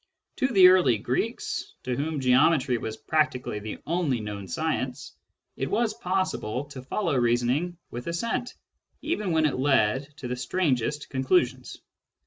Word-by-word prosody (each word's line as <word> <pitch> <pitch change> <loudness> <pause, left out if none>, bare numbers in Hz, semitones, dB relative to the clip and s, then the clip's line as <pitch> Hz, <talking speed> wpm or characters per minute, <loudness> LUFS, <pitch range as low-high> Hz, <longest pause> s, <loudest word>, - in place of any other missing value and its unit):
To 260 - +2
the 195 -8 +7
early 175 -11 +4
Greeks, - - -3
to 125 - -2
whom 145 +2 -2
geometry 130 0 +3
was 110 0 -5
practically 130 -8 0
the 105 0 -6
only 160 -7 0
known 105 -2 -6
science, 130 - -3 0.4
it 135 - -3
was 220 +1 +1
possible 180 - -2
to 135 -3 -8
follow 160 +4 -1
reasoning 125 +8 +1
with 120 +1 -6
assent 230 +8 -2 0.5
even 215 - -1
when 160 -1 +3
it 145 - 0
led 135 0 +2
to 125 - -6
the 125 - -2
strangest 145 -1 -1
conclusions. 130 -2 0
135 Hz, 140 wpm, -26 LUFS, 125-170 Hz, 0.5 s, the